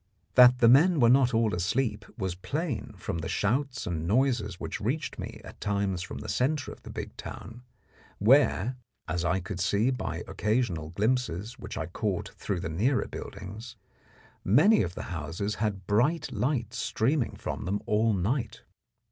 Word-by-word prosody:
That 125 0 +8
the 120 - +5
men 155 +7 +6
were 120 -2 +6
not 130 -1 +5
all 115 -3 +2
asleep 110 +8 0
was 95 -5 -2
plain 120 - -3
from 85 -2 -4
the 80 - -4
shouts 125 +5 0
and 85 -2 -3
noises 110 -4 +1
which - - -5
reached 140 +8 -2
me - - -6
at - - -12
times 100 -3 0
from - - -6
the - - -7
centre 140 +2 0
of - - -12
the - - -11
big - - -6
town, 115 +5 -8 0.6
where, 125 0 +4 0.3
as 85 +2 -1
I 85 +2 +1
could 95 0 -6
see 105 +7 +2
by 125 - -3
occasional 105 -8 -1
glimpses 110 +2 -1
which - - -7
I 80 - -2
caught 90 +2 -2
through 95 -4 -4
the - - -3
nearer 110 - +1
buildings, 105 +4 -8 0.7
many 155 - +5
of 90 -2 -3
the - - -5
houses 85 +6 -3
had 100 -4 -1
bright 125 - +1
lights 125 0 -1
streaming 125 +3 0
from - - -5
them 100 +3 -1
all 110 0 +2
night. 115 +8 -2
110 Hz, 165 wpm, -28 LUFS, 95-125 Hz, 0.7 s, That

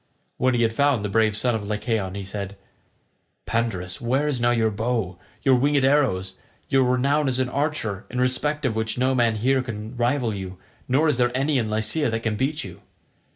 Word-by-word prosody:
When 130 -1 +2
he 120 - +2
had 115 -1 +1
found 140 -4 +2
the - - -2
brave 110 -2 +3
son 120 +2 +1
of 105 -2 -3
Lycaon 105 -2 -2
he 100 - -4
said, 100 0 -6 0.9
"Pandarus, 100 -6 -2
where 130 +5 +1
is 135 -5 -1
now 120 - +3
your 115 -2 +2
bow, 105 -4 -2 0.2
your 135 - +5
winged 140 +2 +3
arrows, 130 -10 +2
and 95 - -26 0.3
your 135 -2 +4
renown 140 +4 +2
as 130 -1 0
an 130 -1 0
archer, 130 -8 -2
in 125 - -3
respect 145 +4 +1
of 115 -4 0
which 110 +1 -1
no 130 +1 +2
man 120 -3 +2
here 130 +5 +2
can 110 -1 -6
rival 120 -1 +1
you 95 -2 -6 0.3
nor 140 +5 +3
is 150 -5 +2
there 120 0 +4
any 140 0 +1
in 110 -2 -1
Lycia 110 +7 0
that 115 0 -2
can 110 -2 0
beat 140 +7 -1
you? 90 -3 -10
120 Hz, 205 wpm, -24 LUFS, 105-130 Hz, 0.9 s, your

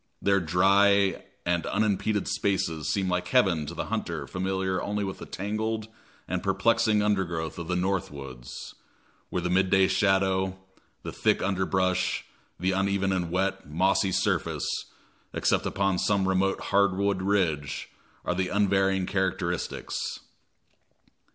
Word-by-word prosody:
Their 100 0 +3
dry 95 +3 +3 0.2
and 85 -1 +1
unimpeded 105 0 0
spaces 85 -6 0
seem 95 -2 0
like 90 0 -1
heaven 90 - +2
to - - -6
the - - -3
hunter - - -3
familiar 95 0 -1
only 105 0 -2
with 95 -1 -4
the - - -8
tangled 110 +2 -3 0.4
and 90 0 -2
perplexing 110 +1 +2
undergrowth 85 -6 -1
of 85 - -5
the 90 - 0
"North 95 0 0
Woods," 65 -4 -9 0.6
where 90 - -2
the 90 - -1
midday 95 +1 +4
shadow, 95 0 +2 0.5
the - - -5
thick - - +1
underbrush, 95 -1 0 0.3
the 95 +2 +1
uneven 95 0 +1
and 90 -3 -1
wet, 95 -1 -1
mossy 95 +4 +2
surface, - - 0 0.7
except - - +1
upon 95 -2 0
some 100 -2 +2
remote 95 +1 +1
hardwood 100 -1 +1
ridge, 90 -8 0 0.4
are - - +1
the 90 0 -1
unvarying 95 -2 +2
characteristics. 95 -2 -2
95 Hz, 130 wpm, -27 LUFS, 90-100 Hz, 0.7 s, midday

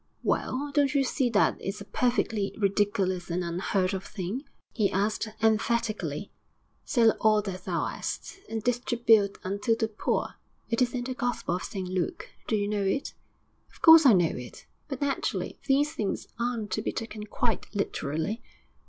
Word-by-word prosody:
'Well, 285 +3 -1
don't 285 -1 +2
you 275 - +4
see 260 -1 +1
that 210 -3 +3
it's 195 +2 -4
a 200 - -8
perfectly 225 -4 0
ridiculous 195 -3 +1
and 175 +1 -1
unheard 185 +3 0
of 190 0 -3
thing?' 215 - -5 0.3
he 210 -4 +1
asked 210 +3 0 0.2
emphatically. 215 -6 0 0.5
'"Sell 230 -5 +4
all 215 -1 +4
that 185 -2 -6
thou - - 0
'ast, 395 - -5
and 225 -1 -3
distribute 235 -4 +3
unto 205 +4 0
the 225 0 0
poor." 220 -1 -2 0.3
It 230 - +1
is 250 0 +2
in 245 - -1
the 255 +1 -3
Gospel 245 -8 -2
of - - -7
St 190 -3 -4
Luke. 180 -2 -3 0.2
Do 220 - +1
you 205 -1 0
know 210 -1 0
it?' 195 +8 -1 0.6
'Of - - -22
course 320 -2 +10
I 240 - +8
know 175 -4 +3
it, 125 -1 -9 0.2
but, 270 -1 -5
naturally, 280 -1 -1
these 290 +2 +3
things 210 -10 -2
aren't 235 -4 -2
to - - 0
be - - -2
taken 215 -2 -6
quite 230 +1 -1
literally.' 180 +2 -2
215 Hz, 170 wpm, -28 LUFS, 195-245 Hz, 0.6 s, course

